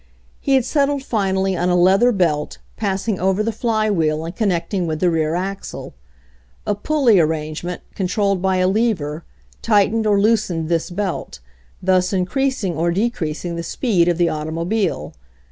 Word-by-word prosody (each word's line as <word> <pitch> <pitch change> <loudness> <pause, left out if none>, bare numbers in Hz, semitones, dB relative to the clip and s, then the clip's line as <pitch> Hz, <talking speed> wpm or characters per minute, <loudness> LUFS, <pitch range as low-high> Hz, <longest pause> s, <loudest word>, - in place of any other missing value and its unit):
He 275 - +2
had 260 -3 +2
settled 280 -1 +1
finally 190 -5 0
on 175 +1 0
a 180 - +3
leather 190 +7 +4
belt, 165 -8 0 0.2
pass 195 -1 -2
ing 210 -5 0
over 190 +3 +1
the 230 - 0
flywheel 205 -9 0
and 170 +2 -6
connecting 185 -2 -1
with 155 -1 -2
the 180 0 +2
rear 160 0 0
axle. 195 +2 -5 0.7
A - - +1
pulley 235 -1 +3
arrangement, 160 +2 -2
controlled 195 0 0
by 190 0 +1
a 185 0 +2
lever, 185 -8 0 0.4
tightened 215 0 +2
or 205 -1 +3
loosened 200 -7 +1
this 165 -1 0
belt, 180 - -4 0.4
thus 185 0 +2
in 185 -2 +1
creasing 265 -6 -1
or 165 +3 0
decreasing 175 -4 -2
the - - -2
speed 175 0 +1
of 175 -2 +2
the 175 - +3
automo 160 +1 -3
bile. 205 -3 -1
190 Hz, 160 wpm, -20 LUFS, 170-215 Hz, 0.7 s, leather